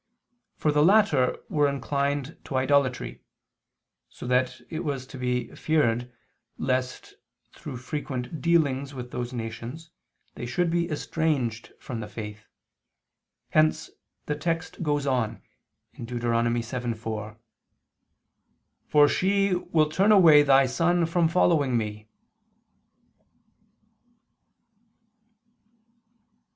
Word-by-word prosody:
For 150 - +1
the 150 0 +3
latter 175 -9 +4
were 150 -1 +2
inclined 140 +1 -2
to 135 - -5
idolatry, 130 -1 +1 0.9
so - - -10
that 125 +1 +1
it 160 - -3
was 140 -5 -3
to 130 - -11
be 125 0 -2
feared 125 -6 0 0.5
lest, 130 -1 -2 0.4
through 135 -4 -8
frequent 130 +2 -5
dealings 140 -5 +1
with 125 -1 -7
those 125 0 -4
nations, 120 +7 -7 0.4
they 120 - -6
should 170 +7 0
be 170 0 0
estranged 145 -7 -2
from 120 -3 -6
the 105 - -5
faith: 105 0 -8 1.0
hence 80 0 +2 0.3
the 150 - -1
text 165 +4 -3
goes 145 -3 0
on 125 -5 -1 0.6
(Deut. 120 +1 -5
7:4): 115 -2 -2 1.5
"For 145 -1 +6
she 195 +3 +2
will 160 -3 +1
turn 195 +7 +3
away 165 -8 +8
thy 135 -1 +5
son 170 +6 +1
from 165 0 +2
following 155 -7 +2
Me." 105 -1 -4
135 Hz, 100 wpm, -26 LUFS, 120-155 Hz, 1.5 s, away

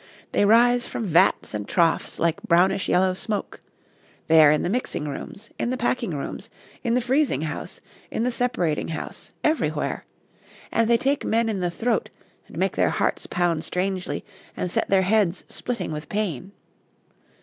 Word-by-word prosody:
They 205 - +3
rise 240 +2 +5
from 230 - -4
vats 170 - +3
and 105 -1 -4
troughs 165 -2 +1
like 165 -1 0
brownish 185 +3 +2
yellow 185 +1 +3
smoke; 205 +2 -4 0.6
they 160 -1 +7
are 150 - +8
in 150 0 +2
the - - 0
mixing 215 -8 -2
rooms, 200 +9 -7
in - - 0
the 255 - -1
packing 240 - -1
rooms, 140 - -6 0.3
in 235 -1 +1
the 250 - +2
freezing 260 - +1
house, 155 +3 -5 0.3
in 225 - -2
the 250 - +1
separating 235 -11 0
house, 160 - -6
everywhere; 310 +1 0 0.7
and 230 0 +2
they 235 - +5
take 275 +4 0
men 230 +1 +1
in 205 -3 -2
the 180 -1 0
throat, 225 +6 -1 0.4
and - - -12
make - - 0
their - - +3
hearts - - -1
pound 170 -3 0
strangely, 185 0 -2 0.3
and 180 - -2
set - - 0
their 195 -1 +4
heads 195 -2 +2
splitting 245 -8 -4
with 150 0 -6
pain. 195 - -2
195 Hz, 170 wpm, -24 LUFS, 170-235 Hz, 0.7 s, are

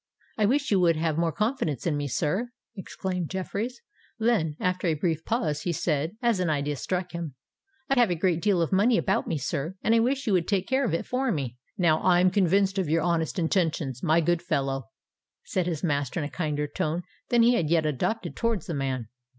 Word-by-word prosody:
"I 210 -2 +2
wish 280 +3 +1
you 195 - +4
would 170 -2 +4
have 160 0 0
more 170 -1 +1
confidence 210 - -1
in 165 -4 +1
me, 145 0 -2
sir," 185 - -1 0.3
exclaimed 185 -3 -4
Jeffreys: 205 +6 -4 0.4
then, 220 -10 +1
after 185 0 0
a 160 - +2
brief 160 0 -1
pause, 155 -11 -1
he 175 - -1
said, 160 +3 -1
as 235 -5 +2
an 180 -2 +1
idea 145 -1 0
struck 180 +5 -2
him, 170 -5 -5 0.5
"I 270 -2 +2
have 240 -4 +5
a 175 - +1
great 170 0 +1
deal 190 -4 +3
of 165 - -3
money 215 +5 +4
about 195 - 0
me, 160 - -1
sir—and 170 - -1
I 230 - +5
wish 265 +4 +1
you 210 - +1
would 175 -2 +2
take 195 -2 0
care 265 +1 +2
of 185 - 0
it - - -3
for 255 0 0
me." 135 - -3 0.2
"Now 160 -4 +3
I 180 -1 +4
am 185 +1 +4
convinced 195 +1 +2
of 180 -5 -1
your 165 0 +2
honest 170 -1 0
intentions, 160 - 0
my 165 0 +3
good 170 +1 +1
fellow," 135 -6 -1 0.6
said 180 -2 -1
his 165 -2 -3
master, 145 -2 0
in - - -2
a 145 - -6
kinder 150 -4 -1
tone 155 +3 -2 0.3
than 240 -1 +4
he 240 +1 +5
had 170 -10 +1
yet 165 -2 +3
adopted 155 - -1
towards 230 -7 -1
the 170 - -4
man. 130 -5 -2
175 Hz, 215 wpm, -27 LUFS, 155-200 Hz, 0.6 s, have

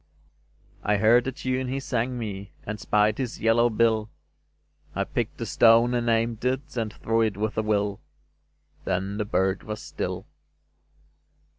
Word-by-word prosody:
I 105 0 +2
heard 115 +4 +5
the 135 - -1
tune 130 0 -2
he 135 +2 -2
sang 125 -1 -2
me, 100 -4 -6
And 105 0 -4
spied 105 +2 +2
his 125 -3 -3
yellow 115 +2 +4
bill; 110 -1 +2 0.9
I - - +1
picked - - -3
a - - -1
stone 115 +1 +5
and 120 -1 0
aimed 115 0 +1
it 130 +2 -2
And 115 -3 -1
threw 115 +3 0
it 110 -4 0
with 110 +2 -2
a - - +1
will: 105 -2 0 0.8
Then 95 +2 -2
the 105 - 0
bird 95 -1 +1
was 105 0 -6
still. - - -5
115 Hz, 155 wpm, -26 LUFS, 105-120 Hz, 0.9 s, heard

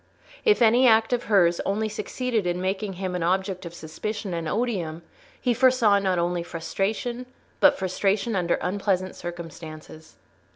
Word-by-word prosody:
If 425 - +4
any 240 +3 +5
act 225 +1 +4
of 245 - -1
hers 175 -5 +3
only 210 +3 0
succeeded 220 -1 -2
in 175 0 -1
making 190 +2 -2
him 185 0 -4
an 180 - -2
object 185 +1 -1
of 170 - -10
suspicion 190 +5 -5
and 165 -2 -3
odium, 180 -7 -2 0.4
he 245 - +1
foresaw 245 -4 +4
not 190 -2 0
only 175 0 0
frustration, 205 +9 -3 0.3
but - - +5
frustration 195 +4 0
under 175 -2 +1
unpleasant 185 0 -1
circumstances. 160 -2 -9
190 Hz, 150 wpm, -25 LUFS, 175-220 Hz, 0.4 s, any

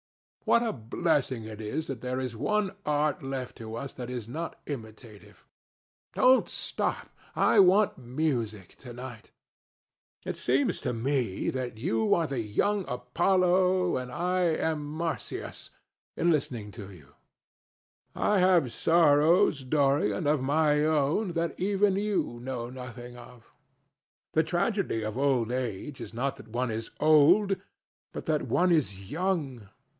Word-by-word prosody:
What 235 - +4
a 230 - -1
blessing 130 0 -1
it 110 0 -8
is 110 +9 -3
that 135 -6 -6
there 125 0 -2
is 130 -3 -4
one 190 - 0
art 150 0 +1
left 135 -2 -5
to 110 0 -7
us 135 +4 -6
that 125 -1 -7
is 120 -4 -5
not 160 +7 -5
imitative! 110 -5 -9 0.7
Don't 255 +1 +5
stop. - - -3 0.2
I 215 - +4
want 195 -1 +5
music 120 - -3
to 125 - -11
night. 120 -2 -9 1.0
It - - -3
seems 130 +3 0
to 125 - -1
me 120 -4 -1
that 125 -4 -4
you 110 0 +1
are 170 - +1
the 140 -4 -3
young 195 - 0
Apollo 180 +7 +2
and 125 -1 -5
that 130 - -7
I 180 +2 0
am 160 -2 0
Marsyas 155 +2 -5 0.5
listening 135 -10 0
to 100 -2 -9
you. 75 -8 -15 1.1
I 210 -2 +2
have 180 -9 +3
sorrows, 160 0 +4
Dorian, 135 -6 +1
of 145 -1 +2
my 150 +2 +2
own, 155 +6 +1
that 170 0 -2
even 200 +1 +2
you 200 - -1
know 120 -2 -4
nothing 125 -1 -9
of. 120 -1 -14 0.8
The 160 - +3
tragedy 175 - -1
of 110 +2 -4
old 130 -5 +1
age 125 +2 -4
is - - -8
not 135 +3 -2
that - - -13
one 120 +2 -2
is 110 +1 -4
old, 165 +7 +5 0.6
but - - -7
that - - +1
one 180 0 +2
is 100 - 0
young. 150 - -2
140 Hz, 140 wpm, -28 LUFS, 120-170 Hz, 1.1 s, Don't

